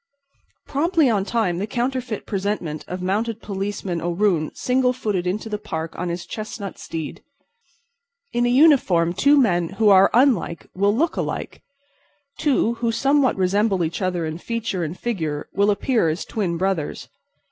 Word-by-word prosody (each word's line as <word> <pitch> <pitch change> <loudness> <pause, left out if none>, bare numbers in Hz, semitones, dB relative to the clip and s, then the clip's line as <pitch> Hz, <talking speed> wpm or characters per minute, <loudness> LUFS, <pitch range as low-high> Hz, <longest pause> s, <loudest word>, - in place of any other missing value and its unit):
Promptly 315 -1 +2
on 200 -3 +1
time 205 -7 0
the 205 - -2
counterfeit 245 -1 -2
presentment 190 -6 -3
of 180 0 -5
Mounted 215 +4 -1
Policeman 195 -4 -4
O'Roon 175 -2 +1
single 250 0 +1
footed 205 -7 -2
into 210 +5 -2
the 210 -1 -3
Park 165 -6 -5
on 180 0 -3
his 175 +1 -4
chestnut 215 -2 -6
steed. 160 -2 -6 1.1
In 240 0 +2
a - - +2
uniform 245 - +4
two 285 +10 +4
men 175 - +2
who 220 -2 +4
are 195 0 +7
unlike 235 -9 +2
will 200 +2 +2
look 325 +7 0
alike; - - -4 0.8
two 260 -6 +2
who 235 -1 +1
somewhat 275 +2 +2
resemble 190 0 +2
each 165 +5 -3
other 180 -3 -1
in 160 +1 -5
feature 230 -4 -3
and 165 +3 -4
figure 160 -11 -3
will 200 +1 +3
appear 210 -3 +2
as 160 +3 -3
twin 185 -6 -2
brothers. 185 -4 -2
200 Hz, 155 wpm, -22 LUFS, 175-235 Hz, 1.1 s, are